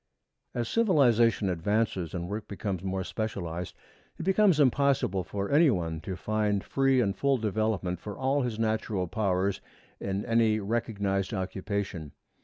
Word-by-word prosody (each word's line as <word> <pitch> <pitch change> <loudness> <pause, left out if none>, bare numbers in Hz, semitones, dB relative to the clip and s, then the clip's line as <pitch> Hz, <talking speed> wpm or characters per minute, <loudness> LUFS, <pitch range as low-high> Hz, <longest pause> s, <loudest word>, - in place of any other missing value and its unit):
As 120 -2 -1
civilization 120 - +3
advances 95 -1 -1
and 85 -1 -3
work 105 +3 -5
becomes 100 -1 -4
more 95 0 -2
specialized, 90 -5 -4 0.4
it - - -5
becomes 190 -2 +4
impossible 135 -8 +2
for 100 +1 -4
any 155 +2 +6
one 85 -7 -1
to 95 - -5
find 105 +1 0
free 135 -1 +2
and 100 -5 +1
full 140 -1 +2
development 105 -5 -1
for 105 +1 -7
all 135 +2 +1
his 120 -4 -2
natural 110 -4 0
powers 95 -1 0 0.4
in 100 +1 -3
any 115 -2 +3
recognized 100 -2 -1
occupation. 95 -4 -4
105 Hz, 140 wpm, -28 LUFS, 95-120 Hz, 0.4 s, any